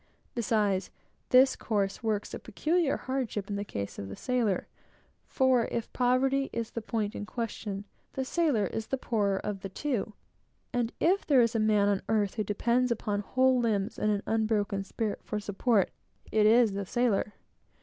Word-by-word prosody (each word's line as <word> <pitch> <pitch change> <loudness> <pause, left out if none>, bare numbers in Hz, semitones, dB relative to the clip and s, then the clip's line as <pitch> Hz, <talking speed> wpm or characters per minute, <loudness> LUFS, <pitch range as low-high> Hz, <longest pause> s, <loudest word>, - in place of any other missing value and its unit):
Besides, 210 -5 +1 0.4
this 260 +1 +6
course 200 -2 -1
works 215 -3 -2
a - - -4
peculiar 310 - 0
hardship 240 -6 -3
in - - -1
the 200 - -2
case 100 - -5
of 100 - -6
the 95 - -6
sailor. 240 -7 0 0.6
For 260 -3 +3
if 235 - -3
poverty 265 +2 +2
is 230 -1 -3
the 230 - -4
point 215 -1 -2
in 205 - -6
question, 210 -4 -4 0.3
the 265 - -2
sailor 285 -9 +1
is 220 +3 -4
the 270 - -1
poorer 205 -6 0
of 205 0 -4
the 195 - -5
two; 230 -2 -2 0.6
and 240 -1 0
if 375 +4 +3
there 275 -4 +6
is 230 - +1
a 225 - +1
man 210 -2 +3
on 200 -1 +1
earth 210 -3 +1
who 215 - -1
depends 235 +5 +1
upon 210 -3 -1
whole 255 +5 +2
limbs 215 -2 0
and 210 - +2
an 205 -1 -1
unbroken 215 -3 0
spirit 215 +1 -3
for 210 - -3
support, 205 +1 +1 0.4
it 215 -1 +4
is 230 0 +5
the 200 -1 -4
sailor. 225 -3 0
220 Hz, 175 wpm, -29 LUFS, 205-250 Hz, 0.6 s, this